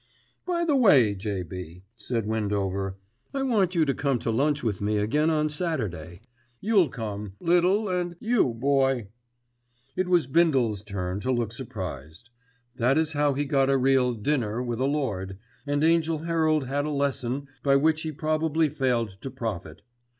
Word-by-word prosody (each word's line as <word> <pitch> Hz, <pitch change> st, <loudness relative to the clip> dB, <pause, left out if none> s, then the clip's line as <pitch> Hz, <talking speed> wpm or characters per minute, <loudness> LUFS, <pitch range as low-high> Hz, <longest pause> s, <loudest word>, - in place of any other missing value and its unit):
"By 340 Hz, -1 st, 0 dB
the 300 Hz, -4 st, +2 dB
way, 140 Hz, -, +5 dB
J.B.," 90 Hz, -3 st, -6 dB
said 115 Hz, 0 st, -3 dB
Windover, 100 Hz, -3 st, -2 dB, 0.4 s
"I 270 Hz, -, 0 dB
want 200 Hz, -8 st, +1 dB
you 165 Hz, -2 st, +3 dB
to 140 Hz, -, +1 dB
come 135 Hz, 0 st, 0 dB
to 115 Hz, -, -2 dB
lunch 145 Hz, +5 st, +1 dB
with 105 Hz, -5 st, -2 dB
me 105 Hz, +1 st, 0 dB
again 145 Hz, +10 st, +1 dB
on 155 Hz, -1 st, +2 dB
Saturday. 110 Hz, -, -4 dB, 0.4 s
You'll 200 Hz, -7 st, +3 dB
come, 105 Hz, -4 st, -6 dB
Little 180 Hz, +5 st, +2 dB
and 180 Hz, -2 st, -2 dB
you, 225 Hz, -, +2 dB
Boy." 135 Hz, -3 st, +1 dB, 0.9 s
It 185 Hz, -, 0 dB
was 175 Hz, -4 st, +3 dB
Bindle's 130 Hz, -, +2 dB
turn 95 Hz, -2 st, -4 dB
to 130 Hz, +5 st, -1 dB
look 120 Hz, -3 st, 0 dB
surprised. 95 Hz, -, -7 dB, 0.5 s
That 125 Hz, +4 st, +2 dB
is 160 Hz, 0 st, +1 dB
how 145 Hz, -1 st, +2 dB
he 145 Hz, +1 st, -1 dB
got 135 Hz, -2 st, +2 dB
a 135 Hz, -, +4 dB
real 130 Hz, -1 st, +3 dB
"dinner" 115 Hz, -1 st, -1 dB
with 120 Hz, -1 st, -3 dB
a 130 Hz, -, +1 dB
lord, 105 Hz, -10 st, -2 dB, 0.3 s
and 145 Hz, +1 st, 0 dB
Angell 165 Hz, -1 st, +2 dB
Herald 160 Hz, -3 st, +1 dB
had 140 Hz, +3 st, -1 dB
a -, -, -2 dB
lesson 140 Hz, -2 st, -1 dB
by 140 Hz, -1 st, +3 dB
which 155 Hz, +3 st, +3 dB
he 160 Hz, -, -3 dB
probably 155 Hz, +1 st, 0 dB
failed 120 Hz, -8 st, -1 dB
to 135 Hz, -, -5 dB
profit. 100 Hz, -8 st, -6 dB
135 Hz, 165 wpm, -26 LUFS, 105-155 Hz, 0.9 s, way